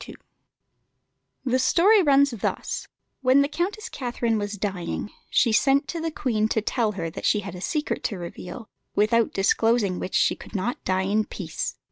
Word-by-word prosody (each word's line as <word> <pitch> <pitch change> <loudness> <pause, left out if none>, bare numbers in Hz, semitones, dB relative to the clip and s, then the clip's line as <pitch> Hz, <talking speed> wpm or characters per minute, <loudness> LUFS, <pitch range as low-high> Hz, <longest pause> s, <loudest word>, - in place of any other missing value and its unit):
] - - -50
The 255 0 +2
story 390 +10 +5
runs 280 -3 +4
thus: 230 -5 -3 0.3
When 265 +2 +5
the - - 0
Countess 375 +8 -3
Catherine 235 -3 -1
was 205 0 -3
dying, 195 0 -3 0.2
she 235 - +3
sent 275 +5 +3
to 335 - -3
the 325 - -1
Queen 230 -8 0
to 220 - +1
tell 220 0 0
her 165 -4 -4
that - - -8
she 210 - +2
had 195 -3 -7
a 180 - -8
secret 300 - -2
to 205 - -1
reveal, 180 +5 -8 0.3
without 220 +2 +3
disclosing 200 0 +2
which 185 - -4
she - - +3
could - - -13
not 205 +6 -2
die 185 0 +1
in 210 +3 +1
peace. - - -5
225 Hz, 175 wpm, -25 LUFS, 200-275 Hz, 0.3 s, story